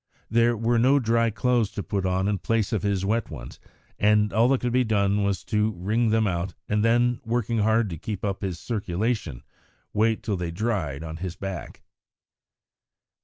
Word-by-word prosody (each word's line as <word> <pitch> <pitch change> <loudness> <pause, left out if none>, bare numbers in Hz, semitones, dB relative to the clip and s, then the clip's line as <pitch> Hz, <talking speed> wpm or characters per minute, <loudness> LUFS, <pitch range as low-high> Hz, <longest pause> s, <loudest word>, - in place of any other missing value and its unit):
There 115 0 +3
were 115 +2 +2
no 130 +4 +5
dry 115 -2 +2
clothes 115 0 +1
to 100 - -4
put 95 -2 -2
on 95 +1 0
in 100 -2 0
place 115 +2 0
of 110 - 0
his 100 -2 0
wet 110 +2 0
ones, 65 -7 -9 0.4
and 105 -1 +3
all 115 +3 +4
that 135 0 +2
could 120 -1 -1
be 125 0 +4
done 100 -2 +1
was 100 -3 -1
to 110 -1 0
wring 105 +6 0
them 110 0 +2
out, 90 -1 -2
and 105 0 +1
then, 120 +1 +2
working 115 -1 -1
hard 110 +1 +3
to 80 - -6
keep 105 +1 -4
up 100 -2 -2
his 95 -4 -3
circulation, 105 - -2 0.5
wait 110 +1 +1
till 100 -3 -1
they 90 -1 -3
dried 85 - -2
on 80 -1 -6
his 90 0 -5
back. 95 -2 -7
105 Hz, 185 wpm, -25 LUFS, 95-115 Hz, 0.5 s, no